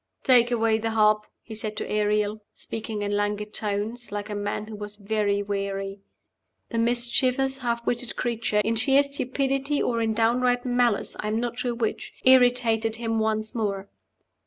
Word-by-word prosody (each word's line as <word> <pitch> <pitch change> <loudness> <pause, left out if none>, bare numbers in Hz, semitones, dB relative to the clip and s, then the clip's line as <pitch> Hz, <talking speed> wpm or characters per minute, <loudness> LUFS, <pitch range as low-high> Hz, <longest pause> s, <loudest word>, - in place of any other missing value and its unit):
"Take 245 -2 +5
away 225 -2 +2
the 225 +1 -2
harp," 215 -1 +3 0.2
he 225 - -9
said 215 -1 -5
to - - -3
Ariel, 210 0 0
speaking 220 -2 -5
in 205 0 -1
languid 210 +1 -2
tones, 215 +3 -2
like 205 +1 -4
a - - -3
man 205 +1 -3
who 215 0 -8
was 210 0 -7
very 205 -1 0
weary. 195 -1 -3 0.7
The 230 - -1
mischievous, 250 +3 +2
half 235 -2 -2
witted 240 0 -2
creature 230 -3 0
in 225 +1 +1
sheer 270 +4 +4
stupidity 275 +1 -1
or 230 -1 0
in 220 -1 0
downright 245 +2 +2
malice, 245 -3 +1
I 210 - -3
am 215 +1 0
not 240 0 -3
sure 245 -2 -1
which 230 -2 -3
irritated 245 -3 +4
him 225 -1 -1
once 220 0 -1
more. 200 -4 -2
225 Hz, 165 wpm, -25 LUFS, 210-245 Hz, 0.7 s, Take